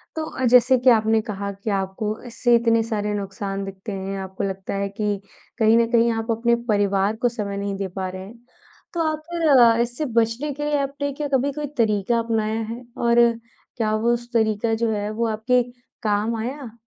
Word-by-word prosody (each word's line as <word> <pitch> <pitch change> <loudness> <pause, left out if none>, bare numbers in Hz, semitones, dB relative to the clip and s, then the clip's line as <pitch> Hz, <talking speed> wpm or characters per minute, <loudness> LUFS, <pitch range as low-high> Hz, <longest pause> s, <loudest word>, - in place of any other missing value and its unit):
तो 315 - -2
अ, 260 - -2
जैसे 250 +2 +6
कि 250 +1 +4
आपने 220 -1 +4
कहा 200 -2 -4
कि 200 +2 -6
आपको 195 +2 -2
इससे 240 0 +2
इतने 230 -1 +3
सारे 210 -2 -2
नुकसान 195 0 -4
दिखते 195 +2 -7
हैं। 195 0 -4
आपको 190 0 -5
लगता 195 0 -4
है 200 0 -1
कि 205 -1 -2 0.4
कहीं 220 +1 +5
न 230 0 +3
कहीं 235 0 +4
आप 225 +1 -2
अपने 235 +1 +2
परिवार 200 0 +2
को 245 - +3
समय 205 -4 -4
नहीं 200 0 -3
दे 195 -1 -2
पा 190 -1 -2
रहे 185 0 -7
हैं। 230 +4 -13 0.6
तो 340 - -1
आप 310 - -4
फ़िर 255 -8 +5
इससे 240 +6 -2
बचने 235 +6 -1
के 295 +1 -4
लिए 295 -1 +1
आपने 280 +1 -3
क्या 290 +1 -3
कभी 270 +2 +2
कोई 295 +1 -4
तरीका 220 +1 +2
अपनाया 225 -1 -1
है? 230 +3 -6
और 235 0 +3 0.6
क्या 215 -2 0
वो 235 +2 +2
उस 240 0 -5
तरीका 220 0 +1
जो 225 0 0
है 205 0 -2
वो 230 +1 -1
आपके 240 +3 +2 0.4
काम 215 +2 +1
आया? 240 0 -6
225 Hz, 200 wpm, -23 LUFS, 205-240 Hz, 0.6 s, जैसे